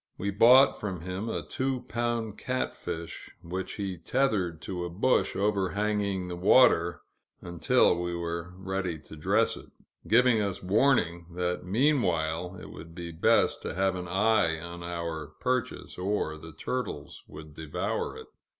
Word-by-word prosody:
We 100 +1 -2
bought 125 +7 +6
from 95 -5 -4
him 95 +5 -4
a - - -3
two 130 -1 -2
pound 120 -3 -2
catfish, 85 -9 -4
which 90 +3 -4
he 95 -3 -4
tethered 95 - 0
to 90 -2 -4
a 85 - -3
bush 105 +9 +1
overhanging 100 -1 0
the 90 - -4
water, 85 -3 +4 0.4
until 85 -1 +2
we 85 0 -2
were 85 +1 -4
ready 95 -3 -3
to 75 +1 -13
dress 100 +8 +2
it; - - -12 0.4
giving 120 0 +5
us 100 -3 -3
warning, 90 -5 +2
that 90 0 -1
meanwhile 90 - +1
it - - -10
would 80 0 -11
be 85 -1 -6
best 80 - +2
to - - -5
have 95 0 +1
an 90 -1 -5
eye 95 -3 +2
on 85 +1 -8
our 85 -3 -5
purchase, 125 -6 -2
or 95 -4 -1
the 80 +1 -11
turtles 100 - -4
would 75 0 -11
devour 80 -1 -3
it. - - -10
90 Hz, 150 wpm, -28 LUFS, 85-105 Hz, 0.4 s, bought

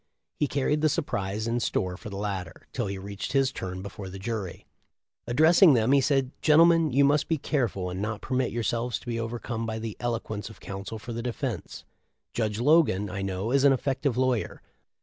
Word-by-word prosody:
He 150 - +2
carried 145 +2 0
the 155 - +4
surprise 105 - -2
in 115 +1 0
store 95 -5 -1
for 105 +4 -9
the 100 - -6
latter, 95 -4 -4
till 120 -5 -1
he 100 0 -4
reached 100 +4 -6
his 135 -1 +3
turn 95 -3 -5
before 100 -1 -7
the 95 - -8
jury. 100 -3 -5 0.6
Addressing 155 +5 +6
them, 115 +2 +2
he 140 0 +5
said: 135 -2 +1
"Gentlemen, 165 0 +5
you 140 +3 +4
must 145 +1 +2
be 165 - +1
careful 120 -11 -1
and 95 +2 -4
not 105 0 -2
permit 130 0 -1
yourselves 120 +1 -1
to - - -16
be 115 -1 -2
overcome 115 0 -4
by 110 0 -3
the 110 -1 -5
eloquence 115 -3 -3
of 110 - -14
counsel 100 +3 -6
for 115 +2 -7
the 115 - -3
defense. 120 -1 -4 0.5
Judge 110 -2 -1
Logan. 120 - +3
I 100 +1 -4
know, 95 +3 -2
is 140 0 +3
an 140 -1 +7
effective 135 -1 -1
lawyer. 130 -3 0
115 Hz, 195 wpm, -27 LUFS, 100-135 Hz, 0.6 s, an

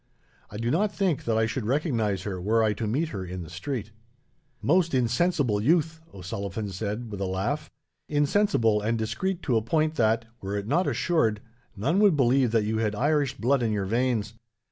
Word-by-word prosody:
I 105 - -8
do 115 +2 -1
not 200 +7 +2
think 190 -7 -1
that 115 -1 +1
I 110 - +3
should 110 0 -3
recognize 115 - 0
her, 95 -3 -4
were 110 +4 +2
I 110 -1 +2
to 105 +2 -3
meet 145 +9 0
her 100 -7 -5
in 90 0 -6
the 80 - -11
street." 110 +5 -4 0.7
"Most 170 0 +2
insensible 125 - +1
youth!" 160 +4 +1
O'Sullivan 100 +2 -5
said, 105 +4 -4
with 100 -1 -5
a - - 0
laugh; 110 +12 -2 0.4
"insensible 145 - +2
and 115 +2 0
discreet 180 +12 -2
to 125 -6 +2
a - - +2
point 155 +7 +1
that, 115 0 +2 0.2
were 100 +1 -3
it 100 - -3
not 160 - +1
assured, 115 - +1 0.4
none 140 - +1
would 200 -7 +5
believe 130 -1 +3
that 115 -1 +2
you 110 +1 -1
had 105 -2 0
Irish 145 +1 +1
blood 130 +3 +2
in 115 -2 +1
your 100 -2 -1
veins. 115 0 0
115 Hz, 190 wpm, -26 LUFS, 105-145 Hz, 0.7 s, would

